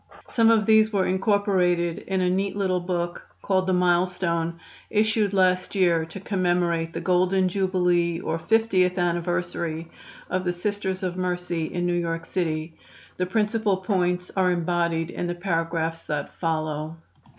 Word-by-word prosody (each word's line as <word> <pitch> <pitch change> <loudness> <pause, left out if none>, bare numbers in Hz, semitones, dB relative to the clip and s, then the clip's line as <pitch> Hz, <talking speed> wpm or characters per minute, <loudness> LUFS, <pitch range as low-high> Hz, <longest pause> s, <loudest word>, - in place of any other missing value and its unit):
Some 230 -1 +4
of 220 -2 +4
these 220 0 +5
were 195 -3 +1
incorporated 185 -4 +1
in 190 -1 -2
a 180 - +2
neat 195 +2 -1
little 190 -3 0
book 175 -1 -3 0.2
called 185 -1 +1
the 185 - +2
"Milestone," 175 -2 +1 0.3
issued 215 -1 +2
last 185 -1 +2
year 170 -4 +3
to 165 +4 -9
commemorate 175 -4 0
the - - -3
golden 185 +1 +2
jubilee 180 -3 +1
or 165 -2 -2
50th 185 -1 +2
anniversary 170 -2 -2 0.4
of 185 0 -1
the 180 - 0
Sisters 190 +1 -3
of 180 -1 -2
Mercy 180 -2 -2
in 175 +2 -3
New 175 - +1
York 165 -1 -2
City. 160 -3 -2 0.4
The 180 - -1
principal 210 -1 +1
points 180 -2 -1
are 185 -2 +3
embodied 170 -1 0
in 175 - -3
the 175 - -2
paragraphs 165 -2 -2
that 150 -2 -3
follow. 155 -1 -2
180 Hz, 150 wpm, -25 LUFS, 170-190 Hz, 0.4 s, these